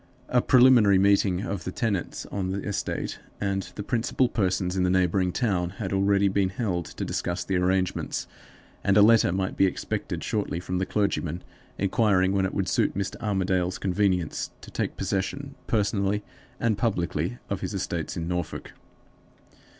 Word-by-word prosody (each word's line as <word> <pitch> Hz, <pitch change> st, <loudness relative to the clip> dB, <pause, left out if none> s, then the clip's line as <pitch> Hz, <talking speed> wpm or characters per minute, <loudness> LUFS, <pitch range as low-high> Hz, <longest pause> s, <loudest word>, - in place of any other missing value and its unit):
A 125 Hz, -, +3 dB
preliminary 125 Hz, -7 st, +6 dB
meeting 100 Hz, -1 st, +3 dB
of 100 Hz, -2 st, -4 dB
the 90 Hz, -, -4 dB
tenants 100 Hz, -3 st, -2 dB
on 95 Hz, -2 st, -2 dB
the 100 Hz, +1 st, -2 dB
estate 105 Hz, -, -3 dB, 0.2 s
and 95 Hz, -1 st, -2 dB
the 105 Hz, -, -4 dB
principal 120 Hz, +3 st, +1 dB
persons 95 Hz, -5 st, 0 dB
in 95 Hz, -, +1 dB
the 90 Hz, -, +2 dB
neighboring 90 Hz, 0 st, +2 dB
town 90 Hz, -6 st, 0 dB
had 95 Hz, -2 st, -3 dB
already 100 Hz, +1 st, +3 dB
been 95 Hz, -1 st, +1 dB
held 95 Hz, -4 st, -2 dB
to -, -, -5 dB
discuss 90 Hz, +1 st, -2 dB
the 95 Hz, 0 st, 0 dB
arrangements, 90 Hz, 0 st, 0 dB, 0.6 s
and 100 Hz, 0 st, +3 dB
a 105 Hz, -, +8 dB
letter 110 Hz, -4 st, +5 dB
might 95 Hz, +1 st, -1 dB
be 95 Hz, -, +4 dB
expected 95 Hz, -, -3 dB
shortly 105 Hz, -5 st, -1 dB
from 90 Hz, +1 st, -3 dB
the 95 Hz, -, -1 dB
clergyman 90 Hz, -4 st, -1 dB, 0.3 s
inquiring 100 Hz, -1 st, +2 dB
when 95 Hz, -1 st, +1 dB
it -, -, -7 dB
would 95 Hz, -2 st, 0 dB
suit -, -, +1 dB
Mr. 100 Hz, -1 st, -2 dB
Armadale's 95 Hz, -4 st, 0 dB
convenience 95 Hz, -3 st, 0 dB
to -, -, -12 dB
take -, -, -3 dB
possession 135 Hz, +9 st, -2 dB
personally 105 Hz, -1 st, +1 dB, 0.4 s
and 110 Hz, -4 st, +1 dB
publicly 90 Hz, -, -1 dB
of -, -, -3 dB
his -, -, -3 dB
estates -, -, -3 dB
in 80 Hz, 0 st, -3 dB
Norfolk. 90 Hz, -2 st, -4 dB
95 Hz, 165 wpm, -26 LUFS, 90-105 Hz, 0.6 s, a